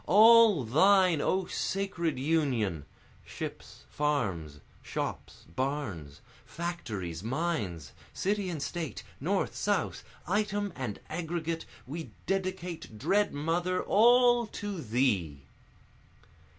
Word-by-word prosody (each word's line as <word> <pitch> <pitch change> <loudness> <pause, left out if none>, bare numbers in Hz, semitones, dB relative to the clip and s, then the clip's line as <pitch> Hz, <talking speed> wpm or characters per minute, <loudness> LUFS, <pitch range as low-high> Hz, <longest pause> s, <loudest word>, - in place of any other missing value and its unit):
All 220 - +7
thine 180 - +4
O 190 +4 +1
sacred 180 -8 -2
Union! 130 - 0 0.4
Ships, - - -8
farms, 95 - -1 0.2
shops, - - -5
barns, 105 - -3 0.2
factories, 110 - -5
mines, 110 - -2 0.2
City 200 -1 -1
and 155 -5 -3
State, 165 -3 -4 0.2
North, 190 +7 -1
South, 205 -2 -1 0.2
item 205 0 0
and 125 -6 -4
aggregate, 165 -1 -3 0.2
We 160 +5 -6 0.2
dedicate, 185 - -3
dread 205 - +2
Mother, 170 +5 -1
all 240 +2 +5
to 205 -4 -5
thee! 105 - 0
165 Hz, 95 wpm, -30 LUFS, 120-195 Hz, 0.4 s, All